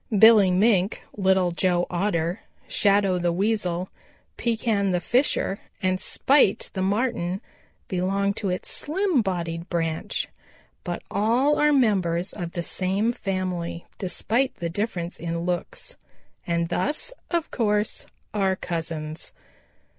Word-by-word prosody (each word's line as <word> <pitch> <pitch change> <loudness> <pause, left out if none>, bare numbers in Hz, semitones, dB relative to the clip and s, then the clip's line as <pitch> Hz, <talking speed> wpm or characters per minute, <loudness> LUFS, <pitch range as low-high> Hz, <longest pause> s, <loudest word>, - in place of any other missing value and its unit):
Billy 220 -2 +8
Mink, 190 +1 +2
Little 190 -2 +3
Joe 175 0 +1
Otter, 175 0 0 0.3
Shadow 200 -3 +3
the 175 0 +1
Weasel, 185 -2 0 0.5
Pekan 220 -4 0
the 180 -1 +1
Fisher 240 - +1 0.2
and 185 -1 +1
Spite 270 -8 +3
the 190 - -2
Marten 195 -2 0 0.5
belong 195 +2 0
to 200 -1 -3
its 180 - -3
slim 345 -2 +1
bodied 170 -3 -3
branch. 165 -2 -1 0.6
But - - -4
all 240 +8 +2
are 300 0 +5
members 190 - +2
of 175 -4 -5
the 175 - -2
same 195 +6 0
family 185 -6 -3
despite 230 +7 0
the 170 - -3
difference 180 -3 -3
in 170 0 -3
looks, 180 - -3 0.5
and 170 -1 0
thus, 295 - -1 0.2
of 340 -2 -1
course, 210 -2 0 0.3
are 195 -2 +2
cousins. 160 -3 -4
190 Hz, 120 wpm, -25 LUFS, 175-220 Hz, 0.6 s, Billy